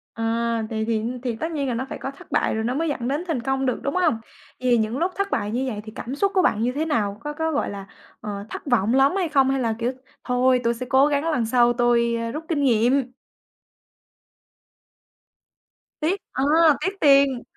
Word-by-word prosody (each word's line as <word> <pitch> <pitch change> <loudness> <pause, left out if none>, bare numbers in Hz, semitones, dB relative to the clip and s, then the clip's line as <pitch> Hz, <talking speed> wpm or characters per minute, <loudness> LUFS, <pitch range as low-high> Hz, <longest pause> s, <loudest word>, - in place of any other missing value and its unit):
À, 230 0 -1
thì 220 -1 -2
thì 220 -1 -1 0.2
thì 240 -3 -2
tất 320 +8 -4
nhiên 285 -3 -2
là 245 - -1
nó 255 +3 -2
phải - - -5
có 270 - -5
thất 275 - -17
bại - - +1
rồi 220 - -1
nó 245 +2 -1
mới 325 +1 0
dẫn 250 -4 -3
đến 290 +6 -1
thành 280 -8 -1
công 270 +1 -1
được, 255 - 0
đúng 280 +4 -2
không? 350 -7 +3 0.5
Vậy 255 0 -1
thì 240 - +5
những 220 +3 -1
lúc 350 +4 0
thất 395 0 -2
bại 205 +1 -1
như 255 +3 -1
vậy 210 -4 -4
thì 215 - -9
cảm 255 +4 -5
xúc 395 +6 +1
của 370 - +5
bạn 215 -10 +1
như 245 +2 +1
thế 300 +4 -2
nào? 210 -9 -1
Có 295 0 -4
có, 320 +1 -1
gọi 290 - -1
là, 200 -1 -7 0.4
ờ, 200 -1 -5
thất - - -7
vọng 240 -3 +2
lắm 275 +6 +4
hay 360 -5 0
không 270 -3 +3
hay 270 0 +1
là, 230 -3 0
kiểu, 240 +2 0 0.3
thôi 250 0 +2
tôi 235 0 +2
sẽ 250 +2 -6
cố 270 +2 +5
gắng 295 +3 0
lần 240 -6 0
sau 240 +1 +3
tôi, 235 -1 +2
ờ, 230 0 -3
rút 310 +2 -5
kinh 290 -4 0
nghiệm? 250 +2 +2 2.9
Tiếc. 360 +5 0
À! 265 - -2 0.4
Tiếc 380 - 0
tiền. 275 -3 +4
255 Hz, 230 wpm, -23 LUFS, 230-285 Hz, 2.9 s, thì